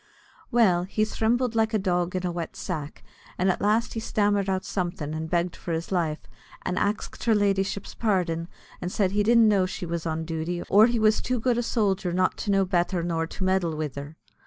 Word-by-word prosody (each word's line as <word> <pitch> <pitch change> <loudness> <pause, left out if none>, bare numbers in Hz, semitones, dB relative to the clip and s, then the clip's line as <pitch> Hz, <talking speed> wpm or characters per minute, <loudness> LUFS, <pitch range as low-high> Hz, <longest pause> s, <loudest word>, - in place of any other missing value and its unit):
Well, 185 -7 +3
he 215 +3 0
thrimbled 235 +3 0
like 220 -1 +1
a - - +5
dog 180 -2 0
in 185 0 -1
a 180 - 0
wet 170 -1 -5
sack, 155 -6 -5 0.3
and 185 +1 +3
at - - -4
last 215 +3 +1
he 225 - -3
stammered 205 -3 +1
out 190 0 -1
somethin', 175 -5 -3
and 160 0 -4
begged 175 +1 0
for 170 - -5
his 165 +3 -3
life, 165 -4 0 0.4
and 185 0 -1
ax'd 210 +1 -2
her 225 -2 +4
ladyship's 200 -1 0
pardin, 180 -6 0 0.3
and 180 - -3
said 190 -2 +1
he 205 +1 +1
didn't 230 +1 +5
know 195 -3 +3
she 185 - -5
was 170 -1 -3
on 160 0 -2
duty, 165 +2 -3
or 210 +3 +6
he 240 -1 0
was 215 -1 +3
too 250 -1 -1
good 240 +1 +1
a - - +2
sojer 200 -6 0
not 185 0 +2
to - - -4
know 195 -1 +3
betther 180 -1 0
nor 165 -1 -1
to 185 - -6
meddle 185 -4 +1
wid 150 -3 -3
her. 145 +3 -8
185 Hz, 215 wpm, -26 LUFS, 170-210 Hz, 0.4 s, or